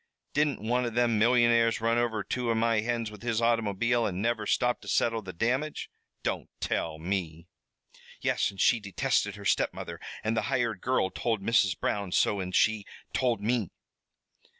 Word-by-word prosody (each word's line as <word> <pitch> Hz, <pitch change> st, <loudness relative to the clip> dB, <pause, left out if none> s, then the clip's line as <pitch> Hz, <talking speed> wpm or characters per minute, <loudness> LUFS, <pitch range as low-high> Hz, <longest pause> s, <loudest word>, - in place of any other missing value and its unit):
Didn't 150 Hz, -2 st, +1 dB
one 125 Hz, +3 st, +1 dB
of 115 Hz, -1 st, -4 dB
them 120 Hz, -3 st, +2 dB
millionaires 115 Hz, 0 st, +4 dB
run 115 Hz, +1 st, +2 dB
over 115 Hz, -3 st, 0 dB
two 125 Hz, +3 st, -2 dB
of 115 Hz, -, +2 dB
my 115 Hz, -1 st, +2 dB
hens 115 Hz, 0 st, -2 dB
with 105 Hz, -, -12 dB
his 115 Hz, -2 st, 0 dB
automobile 115 Hz, 0 st, +1 dB
an' 90 Hz, -2 st, -3 dB
never 110 Hz, -1 st, -1 dB
stop 125 Hz, -1 st, +1 dB
to -, -, -13 dB
settle 115 Hz, -1 st, +1 dB
the 95 Hz, -3 st, -7 dB
damage? 130 Hz, -, -2 dB, 0.3 s
Don't -, -, -2 dB
tell 80 Hz, -1 st, -2 dB
me!" 85 Hz, -1 st, -3 dB, 0.7 s
"Yes, -, -, +1 dB
and 100 Hz, -1 st, -12 dB
she 120 Hz, -, +4 dB
detested 105 Hz, +1 st, 0 dB
her 100 Hz, -1 st, -10 dB
step -, -, +1 dB
mother -, -, -7 dB, 0.2 s
the 110 Hz, 0 st, +1 dB
hired 110 Hz, -2 st, -1 dB
girl 125 Hz, -7 st, +1 dB
told 110 Hz, +1 st, -2 dB
Mrs. 100 Hz, -4 st, +2 dB
Brown 100 Hz, -3 st, -1 dB
so, 100 Hz, +2 st, +2 dB
an' 90 Hz, 0 st, -4 dB
she 110 Hz, +2 st, +2 dB, 0.3 s
told 120 Hz, -5 st, +1 dB
me." 115 Hz, -2 st, 0 dB
115 Hz, 175 wpm, -28 LUFS, 100-120 Hz, 0.7 s, millionaires